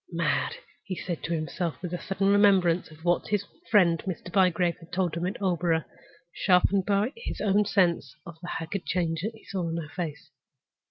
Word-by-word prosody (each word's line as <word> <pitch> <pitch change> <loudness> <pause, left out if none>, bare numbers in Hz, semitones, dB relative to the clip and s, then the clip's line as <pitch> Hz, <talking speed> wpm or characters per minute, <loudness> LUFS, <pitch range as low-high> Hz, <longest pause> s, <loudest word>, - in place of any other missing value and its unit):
"Mad!" 470 - 0 0.3
he 190 - -4
said 175 -2 -4
to 170 - -4
himself, 160 +1 -2
with 180 -1 -4
a 175 - -3
sudden 195 0 0
remembrance 195 -4 +4
of 160 +1 -15
what 175 0 +2
his 205 -1 0 0.2
friend 175 -7 +4
Mr. 180 0 -5
Bygrave 180 -3 +3
had 165 -1 -16
told 180 -2 0
him 170 +1 -1
at 190 - -4
Aldborough, 175 -4 +1 0.5
sharpened 190 +1 +3
by 205 +5 +2
his 470 - -6
own 205 0 +3
sense 175 - +1
of 170 - -9
the 175 - -6
haggard 175 +3 -4
change 165 -3 0
that 220 +4 -3
he 220 - -17
saw 180 -4 -3
in 165 - -2
her 155 -2 -5
face. 165 -5 -5
180 Hz, 195 wpm, -27 LUFS, 170-195 Hz, 0.5 s, remembrance